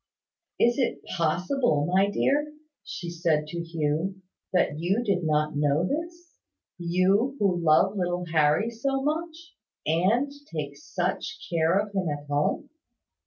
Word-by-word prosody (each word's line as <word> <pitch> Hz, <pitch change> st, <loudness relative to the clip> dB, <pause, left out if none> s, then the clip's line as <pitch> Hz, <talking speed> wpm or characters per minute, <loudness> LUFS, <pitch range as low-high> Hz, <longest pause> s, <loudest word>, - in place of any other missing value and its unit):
"Is 240 Hz, +3 st, +3 dB
it 255 Hz, -, -1 dB
possible, 175 Hz, -, +1 dB
my 190 Hz, +4 st, +3 dB
dear," 295 Hz, +7 st, 0 dB, 0.3 s
she 175 Hz, -2 st, -6 dB
said 165 Hz, -3 st, +1 dB
to 170 Hz, +1 st, -4 dB
Hugh, 165 Hz, +3 st, -2 dB, 0.3 s
"that 175 Hz, -5 st, +1 dB
you 190 Hz, +8 st, +1 dB
did 195 Hz, -5 st, 0 dB
not 150 Hz, -1 st, +1 dB
know 145 Hz, +4 st, +2 dB
this, 340 Hz, -, -5 dB, 0.4 s
you 185 Hz, +9 st, +2 dB
who 185 Hz, -6 st, +1 dB
love 165 Hz, +5 st, +4 dB
little 180 Hz, -2 st, -1 dB
Harry 160 Hz, +6 st, +2 dB
so 270 Hz, +4 st, -1 dB
much, 325 Hz, +2 st, -3 dB, 0.3 s
and 195 Hz, -, +2 dB, 0.2 s
take -, -, -4 dB
such 310 Hz, 0 st, -4 dB
care 165 Hz, +2 st, +3 dB
of 205 Hz, 0 st, -1 dB
him 190 Hz, -4 st, 0 dB
at 145 Hz, 0 st, -4 dB
home? 145 Hz, -, -1 dB
185 Hz, 135 wpm, -26 LUFS, 160-245 Hz, 0.4 s, love